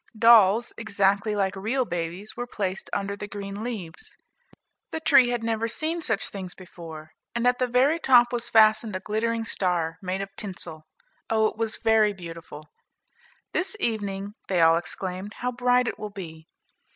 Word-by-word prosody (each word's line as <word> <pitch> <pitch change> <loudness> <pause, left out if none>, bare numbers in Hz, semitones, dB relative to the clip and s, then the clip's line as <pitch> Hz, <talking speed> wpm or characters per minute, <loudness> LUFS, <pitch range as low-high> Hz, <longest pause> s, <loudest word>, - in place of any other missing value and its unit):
Dolls, 225 -1 +6
exactly 200 -1 +1
like 195 -1 0
real 230 +7 -1
babies, 175 +4 -5
were 245 - -4
placed 190 -5 -4
under 200 0 -2
the 205 0 -7
green 200 0 -6
leaves, 200 -9 -7 0.7
the 320 - -4
tree 255 -5 +5
had 240 -1 -2
never 225 0 0
seen 315 +8 -2
such 225 -8 -1
things 190 -3 -7
before, 160 -4 -11 0.2
and 235 0 0
at 250 0 +3
the 255 - +1
very 260 +7 +3
top 245 -5 +5
was 240 0 -2
fastened 215 -1 +4
a - - -2
glittering 225 +3 -1
star, 175 -5 -1
made 190 0 -3
of 195 0 -7
tinsel. 170 -6 -7 0.4
Oh, 220 -1 +3
it - - -12
was 225 0 -1
very 220 -2 +3
beautiful! 165 -4 -10 0.8
"This 380 +3 +1
evening," 205 - -2
they 185 -2 +1
all 165 0 +6
exclaimed, 185 +4 -4
"how 250 0 -2
bright 245 0 +2
it - - -4
will 210 - -5
be!" 165 -5 -9
210 Hz, 165 wpm, -25 LUFS, 185-235 Hz, 0.8 s, Dolls